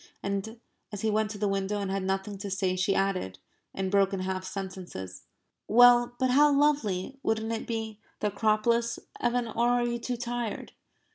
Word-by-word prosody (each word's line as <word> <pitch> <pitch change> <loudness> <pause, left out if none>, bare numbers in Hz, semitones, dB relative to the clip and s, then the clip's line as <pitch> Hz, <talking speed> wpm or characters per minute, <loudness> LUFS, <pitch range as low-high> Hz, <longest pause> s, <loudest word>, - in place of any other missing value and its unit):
And, 200 +3 -3 0.3
as 205 -2 -6
he 220 - +1
went 215 0 +1
to 215 - -6
the 205 0 0
window 195 +1 -1
and 195 -1 -2
had 195 0 -1
nothing 195 +1 -2
to 200 0 -5
say 190 -1 0
she 185 +2 +1
added, 185 - -1 0.3
in 190 -1 -3
broken 195 -1 +2
half 185 0 -3
sentences: 185 - -7 0.4
"Well, 240 +1 +6
but 255 0 +1
how 295 +3 +6
lovely 275 -5 +1
wouldn't 220 -1 -1
it 225 - -4
be? 220 -2 -4 0.2
The 210 - 0
Acropolis, 220 +3 +1 0.2
Evan 240 0 0
or 235 +2 +1
are 245 0 +2
you 240 0 -2
too 245 +1 -3
tired?" 240 -2 -4
210 Hz, 180 wpm, -28 LUFS, 195-235 Hz, 0.4 s, Well